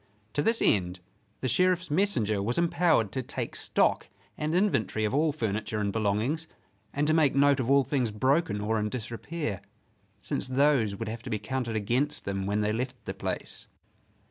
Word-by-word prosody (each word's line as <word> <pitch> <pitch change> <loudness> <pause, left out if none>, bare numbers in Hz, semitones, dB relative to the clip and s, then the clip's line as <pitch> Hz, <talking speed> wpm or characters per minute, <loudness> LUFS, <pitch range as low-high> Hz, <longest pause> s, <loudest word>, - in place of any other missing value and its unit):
To 145 - +1
this 225 +7 +2
end 90 -3 +2 0.4
the 130 - 0
Sheriff's 180 +4 +2
messenger 120 - +1
was 115 +5 -1
empowered 170 - +2
to 130 - -2
take - - -5
stock - - +1 0.3
and 155 +2 -2
inventory 145 - +1
of 105 - -1
all 155 +2 +3
furniture 110 -5 -2
and 100 -2 -1
belongings 115 +10 0 0.4
and 145 +1 0
to 155 - +3
make 155 -4 +3
note 140 0 +4
of 125 -1 -1
all 140 0 +5
things 130 -4 0
broken 115 0 +1
or 110 +1 0
in 105 0 -1
disrepair, 120 - -4 0.6
since - - -2
those 130 -5 +2
would 115 +3 -5
have 115 +1 -5
to 125 - -8
be 110 - 0
counted 115 +1 -3
against 120 +7 0
them 95 -1 -2
when 105 +1 0
they 105 0 +1
left 125 +3 -2
the - - -3
place. - - -4
125 Hz, 180 wpm, -28 LUFS, 105-150 Hz, 0.6 s, all